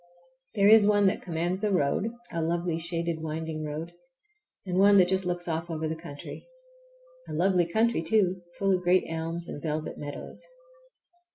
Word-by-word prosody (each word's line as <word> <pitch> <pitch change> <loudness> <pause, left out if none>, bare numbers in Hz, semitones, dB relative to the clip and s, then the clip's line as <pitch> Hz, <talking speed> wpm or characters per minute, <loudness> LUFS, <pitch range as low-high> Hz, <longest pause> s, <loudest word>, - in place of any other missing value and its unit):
There 200 -1 +4
is 215 -1 +7
one 205 -1 +4
that 195 +2 +2
commands 175 +2 -2
the 210 - +1
road, 185 +5 +1 0.2
a 170 - -2
lovely, 170 0 -1
shaded, 170 -1 -2
winding 160 0 -4
road, 155 +3 -5 0.7
and 185 -1 -1
one 200 +1 +7
that 185 -2 +6
just 190 0 0
looks 175 0 -3
off 165 +1 -2
over 160 -1 -2
the 160 - -2
country. 160 - -10 0.8
A - - -5
lovely 180 +1 +2
country, 220 +1 +1
too, 185 +1 +1 0.2
full 195 -1 +2
of 180 - +1
great 180 +1 +3
elms 165 +1 -4
and 145 - -7
velvet 155 -1 -3
meadows. 145 - -7
170 Hz, 170 wpm, -28 LUFS, 160-190 Hz, 0.8 s, is